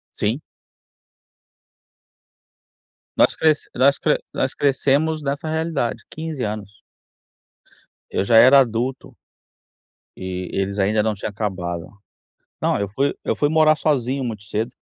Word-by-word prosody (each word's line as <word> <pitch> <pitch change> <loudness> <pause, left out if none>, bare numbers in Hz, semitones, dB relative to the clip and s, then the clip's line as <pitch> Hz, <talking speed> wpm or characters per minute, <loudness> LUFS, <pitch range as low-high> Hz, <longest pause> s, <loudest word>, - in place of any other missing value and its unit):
Sim. 115 +8 -1 2.8
Nós - - +5
cres 155 -2 +1
nós 140 +2 +4
cre - - +2 0.2
nós - - -1
crescemos 145 +3 +1
nessa 145 +2 -3
realidade, 160 -6 -2
15 155 -4 -5
anos. 105 -1 -6 1.3
Eu - - -1
já 115 +3 +4
era 130 +4 +8
adulto. 125 +1 -1 1.0
E 95 -1 -5
eles 100 +1 -2
ainda 105 +2 +2
não 110 0 0
tinham 105 +1 -5
acabado. 90 -5 -4 0.8
Não, - - +1
eu 100 0 -2
fui 135 +8 0
eu - - 0
fui 145 - +2
morar 155 0 +4
sozinho 135 -3 0
muito 110 -4 -5
cedo. 110 +2 -2
120 Hz, 120 wpm, -21 LUFS, 105-145 Hz, 2.8 s, era